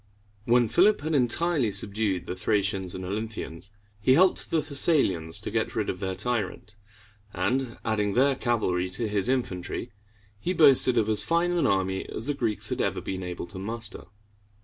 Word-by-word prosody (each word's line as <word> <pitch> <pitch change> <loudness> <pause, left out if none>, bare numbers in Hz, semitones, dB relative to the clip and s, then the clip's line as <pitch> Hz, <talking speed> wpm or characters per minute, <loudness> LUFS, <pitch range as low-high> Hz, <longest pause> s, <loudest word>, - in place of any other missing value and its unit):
When 120 0 +4
Philip 195 - +4
had 155 +2 -2
entirely 140 +1 +2
subdued 100 -2 0
the 90 - -4
Thracians 95 -2 0
and 95 - -6
Olynthians, 100 -3 -5 0.3
he 130 +6 +4
helped 185 +4 +3
the 160 - +1
Thessalians 135 - 0
to - - -5
get - - -1
rid - - 0
of 90 - -9
their 95 -1 -3
tyrant; 105 -3 -3 0.6
and, 130 -2 -1
adding 105 -2 0
their 135 +4 +3
cavalry 95 -8 0
to 105 +5 -2
his 105 +1 0
infantry, 120 -3 -2 0.5
he 180 - -1
boasted 135 -6 +5
of 110 -2 +2
as 110 -1 +3
fine 170 +1 +1
an 175 -1 +1
army 95 -1 0
as 110 - -5
the 145 - 0
Greeks 115 -6 -1
had - - -1
ever - - -1
been 95 0 -5
able 90 -1 -5
to 95 +2 -9
muster. 110 +2 -3
110 Hz, 170 wpm, -26 LUFS, 95-135 Hz, 0.6 s, boasted